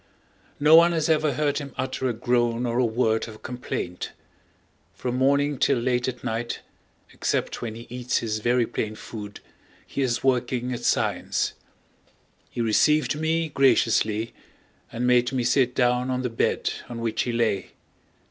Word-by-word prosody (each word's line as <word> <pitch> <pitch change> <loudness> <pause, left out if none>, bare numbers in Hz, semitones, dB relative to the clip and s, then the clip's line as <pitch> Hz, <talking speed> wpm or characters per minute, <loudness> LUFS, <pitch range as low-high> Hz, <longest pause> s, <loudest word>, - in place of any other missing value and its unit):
No 150 +2 +5
one 170 +1 +7
has 160 -1 0
ever 155 -2 +2
heard 145 +1 0
him 140 -3 -8
utter 130 0 -2
a - - -1
groan 120 0 +1
or 120 0 0
a 125 - +4
word 110 -1 +1
of 110 -1 -12
complaint. 120 -7 -5 0.8
From 125 -1 -3
morning 140 +1 +2
till 140 - +3
late 125 0 0
at 125 -1 -5
night, 115 +1 -3 0.5
except - - -2
when 115 -2 -4
he 115 +1 -9
eats 125 0 -2
his 110 -2 -2
very 120 +2 +2
plain 110 -1 -3
food, 105 -2 -8 0.4
he 140 - -4
is 125 -2 0
working 125 -1 0
at 120 0 -6
science. - - 0 1.0
He 120 - -4
received 150 +7 +2
me 160 +1 0
graciously 115 -5 +2 0.6
and 120 +2 -2
made 125 0 +3
me 130 -2 0
sit 125 +1 +2
down 125 0 +2
on 130 0 -1
the 125 - -2
bed 115 - 0 0.2
on 120 - -6
which 115 -1 -1
he 120 - -1
lay. 115 -5 0
125 Hz, 160 wpm, -25 LUFS, 115-135 Hz, 1.0 s, one